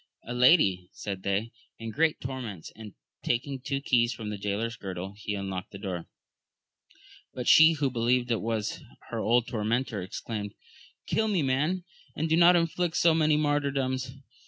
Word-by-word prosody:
A 120 Hz, -, -6 dB
lady, 125 Hz, -, +4 dB
said 100 Hz, -2 st, -5 dB
they, 100 Hz, +4 st, -1 dB, 0.3 s
in 115 Hz, 0 st, -6 dB
great 155 Hz, +4 st, +1 dB
tor 130 Hz, 0 st, -5 dB
ments; 100 Hz, -9 st, -7 dB
and 110 Hz, -2 st, -11 dB, 0.3 s
taking 130 Hz, +3 st, -1 dB
two 135 Hz, +2 st, -3 dB
keys 120 Hz, -3 st, +2 dB
from 110 Hz, -3 st, -6 dB
the 105 Hz, -, -4 dB
jaylor's 105 Hz, +3 st, -2 dB
girdle, 95 Hz, -3 st, -6 dB
he 105 Hz, 0 st, -4 dB
unlocked 95 Hz, -2 st, -4 dB
the 100 Hz, -, -9 dB
door; 95 Hz, -4 st, -5 dB, 1.3 s
but 125 Hz, -1 st, -4 dB
she, 160 Hz, +1 st, +8 dB
who 140 Hz, -4 st, -1 dB
believed 120 Hz, +1 st, +1 dB
it 115 Hz, -, +1 dB
was 110 Hz, -2 st, -2 dB, 0.3 s
her -, -, -3 dB
old 120 Hz, +1 st, +2 dB
tormentor, 115 Hz, -1 st, -1 dB
exclaimed. 105 Hz, +2 st, -5 dB, 0.5 s
Kill 220 Hz, -, +1 dB
me 190 Hz, -7 st, +1 dB
man, 150 Hz, +8 st, 0 dB, 0.3 s
and 160 Hz, -, -1 dB
do 160 Hz, -, +3 dB
not 175 Hz, +1 st, +7 dB
inflict 170 Hz, 0 st, 0 dB
so 170 Hz, -1 st, +5 dB
many 155 Hz, -1 st, +3 dB
martyrdoms 135 Hz, -3 st, -1 dB
120 Hz, 165 wpm, -28 LUFS, 105-145 Hz, 1.3 s, she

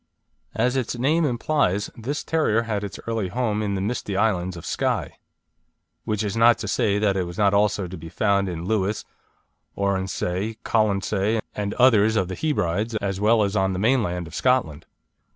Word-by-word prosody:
As 125 Hz, +3 st, +1 dB
its 125 Hz, -2 st, -2 dB
name 155 Hz, +7 st, +2 dB
implies, 120 Hz, -6 st, 0 dB
this 135 Hz, +6 st, -4 dB
terrier 115 Hz, -9 st, +1 dB
had 105 Hz, -3 st, -2 dB
its 100 Hz, -2 st, -6 dB
early 115 Hz, -4 st, -1 dB
home 110 Hz, 0 st, -1 dB
in 100 Hz, -2 st, -1 dB
the 95 Hz, -, -2 dB
misty 105 Hz, -2 st, -2 dB
island 95 Hz, -5 st, 0 dB
of 85 Hz, -, -9 dB
Skye; -, -, -2 dB, 0.9 s
which 105 Hz, 0 st, -1 dB
is 105 Hz, 0 st, -2 dB
not 115 Hz, +1 st, +5 dB
to 105 Hz, -, -5 dB
say 105 Hz, -2 st, +1 dB
that 105 Hz, -2 st, +1 dB
it 95 Hz, -2 st, 0 dB
was 85 Hz, 0 st, -8 dB
not 100 Hz, -2 st, +3 dB
also 100 Hz, -1 st, +2 dB
to 90 Hz, +1 st, -8 dB
be 80 Hz, +1 st, -9 dB
found 100 Hz, +2 st, +1 dB
in 85 Hz, -1 st, -5 dB
Lewis, 105 Hz, 0 st, -1 dB, 0.7 s
Oronsay, 100 Hz, +1 st, -1 dB
Colonsay 105 Hz, 0 st, +1 dB, 0.2 s
and 100 Hz, -1 st, -3 dB
others 110 Hz, -4 st, +4 dB
of 95 Hz, -4 st, +1 dB
the 95 Hz, -, -4 dB
Hebrides, 110 Hz, -, -1 dB
as 100 Hz, -2 st, -2 dB
well 110 Hz, +1 st, +4 dB
as 100 Hz, 0 st, -1 dB
on 95 Hz, -1 st, +1 dB
the -, -, -3 dB
mainland 100 Hz, -5 st, +1 dB
of 80 Hz, -, -12 dB
Scotland. 125 Hz, -, 0 dB
105 Hz, 180 wpm, -24 LUFS, 95-115 Hz, 0.9 s, not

